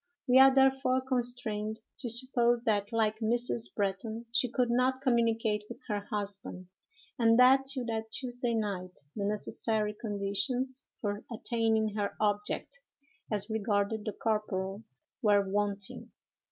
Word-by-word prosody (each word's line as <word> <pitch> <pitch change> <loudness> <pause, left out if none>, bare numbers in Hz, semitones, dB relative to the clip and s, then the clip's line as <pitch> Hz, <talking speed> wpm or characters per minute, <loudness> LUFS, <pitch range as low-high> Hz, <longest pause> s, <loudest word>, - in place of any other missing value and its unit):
We 255 +1 +6
are 270 0 +9
therefore 265 -1 +3
constrained 235 -4 -1 0.2
to 245 - -4
suppose 240 0 +3
that, 205 -1 0
like 220 -1 +1
Mrs. 220 - -1
Bretton, 210 +4 -2
she 245 +1 +1
could 245 0 0
not 260 +2 +1
communicate 225 -4 +1
with - - -7
her 205 -1 -2
husband, 200 -4 -5 0.5
and 230 -1 +5
that, 265 +2 +6
till 270 -2 +2
that 220 -1 -3
Tuesday 245 -1 -2
night, 190 -4 -3 0.2
the 205 -2 -2
necessary 210 +1 -1
conditions 210 +5 -3
for 205 -1 -3
attaining 225 -1 +1
her 205 -1 -3
object, 210 +6 -1 0.5
as 205 -2 0
regarded 210 0 0
the 215 - -3
corporal, 200 -2 -2 0.4
were 205 -2 +3
wanting. 200 0 -2
220 Hz, 130 wpm, -30 LUFS, 205-245 Hz, 0.5 s, are